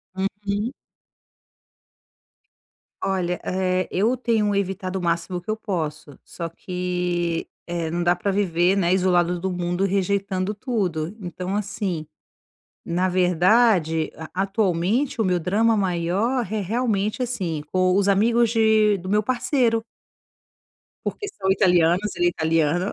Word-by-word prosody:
Uhum. 200 +3 -2 2.3
Olha, 180 -2 -1
eh, 185 0 0
eu 220 +7 +1
tenho 225 -4 +1
evitado 190 -1 -2
o - - -6
máximo 170 +1 -1
que 180 - -13
eu 215 - 0
posso. 155 - -4
Só 170 - -6
que, 180 -1 -2 0.2
eh, 170 -2 -3
não 175 +2 -1
dá 175 +1 +3
pra 180 +3 -2
viver, 185 -2 +2
né, 180 -2 +2
isolados 180 -2 +2
do 190 +2 -2
mundo, 175 +1 -1
rejeitando 195 0 0
tudo. 200 - -2
Então 185 0 -4
assim, 195 -5 -3 0.8
na 180 +2 0
verdade 180 -2 +3
a 160 -1 -8
atualmente, 205 +6 0
o - - +1
meu 180 -1 +2
drama 215 +7 +2
maior 195 +7 0
re 215 +1 -3
realmente 215 +2 -1
assim, 180 -11 -3
o 185 0 +2
os 200 0 +3
amigos 230 +4 +3
de 220 -2 +3
do 185 0 -9
meu 210 +2 +2
parceiro. 245 -1 +1 1.2
Porque 410 - -3
são 190 - -1
italianos 180 +1 +3
ele 175 - +2
é - - +5
italiano. 165 +2 +1
185 Hz, 130 wpm, -23 LUFS, 175-210 Hz, 2.3 s, é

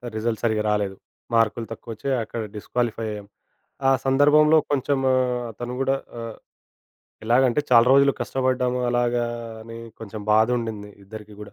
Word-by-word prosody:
Result 110 0 -2
సరిగ్గా 110 -2 +1
రాలేదు. 100 -2 -1 0.4
మార్కులు 115 0 +2
తక్కువొచ్చాయి, 115 +4 -4
అక్కడ 115 +1 -5
డిస్‌క్వాలిఫై 115 +1 -2
అయ్యాం. 105 -1 -8 0.6
ఆ - - +5
సందర్భంలో 145 +3 +5
కొంచము 135 -1 +1 0.4
అతను 120 +3 -6
గూడా 135 0 +2 0.2
ఆహ్, 115 -1 -7 0.9
ఎలాగంటే, 125 +3 +3
చాలా 120 -1 +6
రోజులు 140 0 +5
కష్టపడ్డాము 130 -1 0
అలాగా 120 0 +1 0.4
అని 115 +1 -9 0.2
కొంచెం 110 -1 -7
బాధుండింది 110 -2 +1
ఇద్దరికీ 105 +1 -11
గూడా, 105 - -11
120 Hz, 125 wpm, -23 LUFS, 110-130 Hz, 0.9 s, చాలా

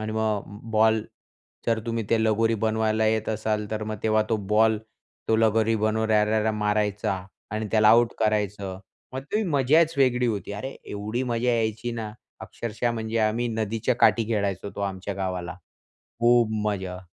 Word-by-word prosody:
आणि 110 0 -4
मग 105 -2 -2
बॉल 110 0 +4 0.6
जर 115 -1 +2
तुम्ही 115 -1 -2
ते 115 -1 +3
लगोरी 115 +1 +2
बनवायला 110 0 +1
येत 110 0 0
असाल 110 -1 -1
तर 110 0 -3
मग 110 0 -4
तेव्हा 110 -1 +3
तो 110 - +3
बॉल 110 0 +4 0.5
तो 110 - +4
लगोरी 110 0 +3
बनवणाऱ्याला 110 0 +1
मारायचा 105 -2 0 0.4
आणि 110 +1 -3
त्याला 110 -1 +5
आऊट 120 +1 +5
करायचं. 105 -3 -1 0.3
मग 130 - -4
ते 215 +1 +2
मजाच 155 +1 +3
वेगळी 125 -2 +3
होती. 105 -2 -3
अरे! 120 +7 -5
एवढी 105 +4 -3
मजा 120 -1 -1
यायची 115 0 -1
ना, 110 -2 -5 0.3
अक्षरशः 115 +1 -3
म्हणजे 110 0 -2
आम्ही 115 +2 +1
नदीच्या 110 +2 -1
काठी 115 -2 +4
खेळायचो 100 -3 -1
तो - - -4
आमच्या 95 0 -3
गावाला. 90 -2 -3 0.7
खूप 120 -1 +4 0.2
मजा 95 -3 -3
110 Hz, 155 wpm, -25 LUFS, 105-115 Hz, 0.7 s, त्याला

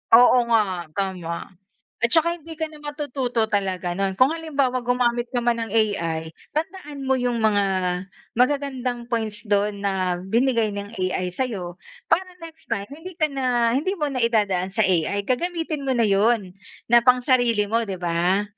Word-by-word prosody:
Oo 245 0 +6
nga, 195 -7 +1
tama. 185 -4 -3 0.5
At - - +6
tsaka 335 +1 +3
hindi 325 +1 -10
ka 320 - -1
na 305 - -13
matututo 275 -6 -2
talaga 190 -4 -1
no'n. 195 0 -1
Kung 255 +4 +6
halimbawa, 280 -6 -1
gumamit 245 0 +1
ka 245 - 0
man 235 -1 +1
ng 225 - -7
AI, 170 -8 0 0.2
tandaan 305 -3 -4
mo 265 - +3
'yong 245 -2 0
mga 205 -2 +3 0.8
magagandang 255 -3 0
points 220 -3 -3
don 205 0 +1
na 185 -3 0
binigay 230 +3 +1
ng 205 0 -6
AI 185 0 -1
sa'yo 190 -7 -3 0.4
para 365 +3 +3 0.2
next 325 -1 -12
time, 200 -3 -1
hindi 325 +5 -9
ka 310 - +3
na 245 -3 +1
hindi 375 +9 0
mo 300 - +1
na 260 - -2
idadaan 200 -5 +1
sa 220 +2 +1
AI. 190 +2 +1
Gagamitin 315 - -2
mo - - +2
na 235 - +3
'yon 200 -1 +2 0.4
na 240 - +8
pang-sarili 245 -4 +3
mo, 230 +2 +1
'di 195 - -3
ba? 175 +3 +1
235 Hz, 165 wpm, -23 LUFS, 200-265 Hz, 0.8 s, na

